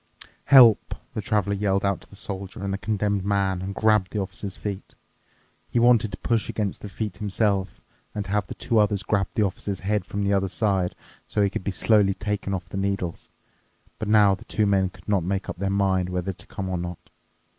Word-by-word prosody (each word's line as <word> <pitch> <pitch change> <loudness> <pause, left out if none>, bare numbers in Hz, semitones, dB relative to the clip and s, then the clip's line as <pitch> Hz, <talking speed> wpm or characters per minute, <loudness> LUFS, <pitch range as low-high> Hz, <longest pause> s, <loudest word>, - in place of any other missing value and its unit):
"Help," 120 -6 +7 0.2
the 110 - -3
Traveler 100 -1 0
yelled 100 -1 +1
out 100 -1 0
to - - -19
the - - -14
Soldier 100 0 -7
and 100 0 -2
the 100 - -3
Condemned 100 0 0
Man 95 -2 0
and 95 +1 -5
grabbed 105 -4 +3
the 105 - -2
Officer's 95 0 -5
feet. 100 -2 -6 0.7
He - - -1
wanted 120 -3 +4
to 95 - -6
push 115 -2 0
against 105 -3 -2
the 105 - -7
feet 105 -2 -4
himself 100 -1 0 0.3
and 105 -1 -2
have 100 -1 -1
the - - -7
two 115 -3 +1
others 105 -2 +2
grab 100 -2 +1
the 110 - +3
Officer's 100 0 -3
head 105 +2 0
from 100 0 -3
the 100 0 +2
other 95 -1 +1
side, 95 -5 0 0.3
so 105 - +1
he 100 - +2
could 95 - -4
be - - -2
slowly 100 0 +3
taken 105 -1 -3
off 95 -3 -2
the - - -6
needles. 95 -3 -2 0.7
But 110 - -3
now 105 -2 +5
the 95 - -6
two 110 - 0
men 95 -2 +2
could 95 - -19
not 100 -4 +2
make 95 +2 -2
up - - -5
their 100 +2 -1
mind 95 -2 +1
whether 90 +1 -2
to - - -15
come 95 -2 -5
or 90 -1 -2
not. 90 -1 -5
100 Hz, 215 wpm, -25 LUFS, 95-105 Hz, 0.7 s, Help